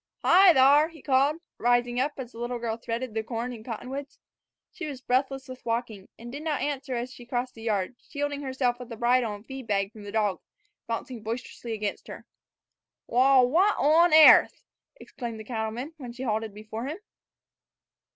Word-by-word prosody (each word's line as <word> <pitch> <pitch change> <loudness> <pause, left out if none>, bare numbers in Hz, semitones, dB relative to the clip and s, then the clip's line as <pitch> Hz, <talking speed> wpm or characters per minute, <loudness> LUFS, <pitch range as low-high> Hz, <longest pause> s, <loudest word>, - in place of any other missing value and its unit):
"Hi 370 +1 +8
thar!" 285 +2 +6
he 325 -2 -15
called, 280 +4 +2 0.2
rising 245 0 +2
up 285 +3 0
as 255 -3 -7
the 230 - -12
little 240 +1 -3
girl 230 -1 -3
threaded 235 +1 -4
the 220 - -1
corn 235 +2 -4
and 220 -2 -10
cottonwoods. 260 +5 -6 0.5
She 350 - -6
was 280 -4 -6
breathless 265 +1 -1
with 255 0 -10
walking, 230 -4 -3
and 235 +1 -9
did 285 +3 -6
not 310 -2 -1
answer 275 -2 -3
as 245 +2 -4
she 245 - -12
crossed 245 +1 -3
the 225 - -13
yard, 215 0 -1
shielding 290 0 -3
herself 260 -3 -1
with 250 -1 -9
the 230 - -6
bridle 240 -1 +2
and 205 - -13
the - - -36
feed 265 -3 -8
bag 195 -1 0
from 220 -2 -13
the 205 0 -8
dog, 210 -3 0 0.5
bounding 230 +1 -4
boisterously 230 +1 -5
against 210 -2 -4
her. - - -9 0.8
"Wal, 255 +1 +5
what 370 +10 +3
on 325 +4 +4
airth!" 310 0 +7 0.3
exclaimed 235 -3 -7
the - - -7
cattleman 230 +5 -4
when 250 -5 -8
she 250 +2 -7
halted 220 -2 -1
before 215 +4 -7
him. 305 +4 -4
245 Hz, 190 wpm, -27 LUFS, 225-275 Hz, 0.8 s, Hi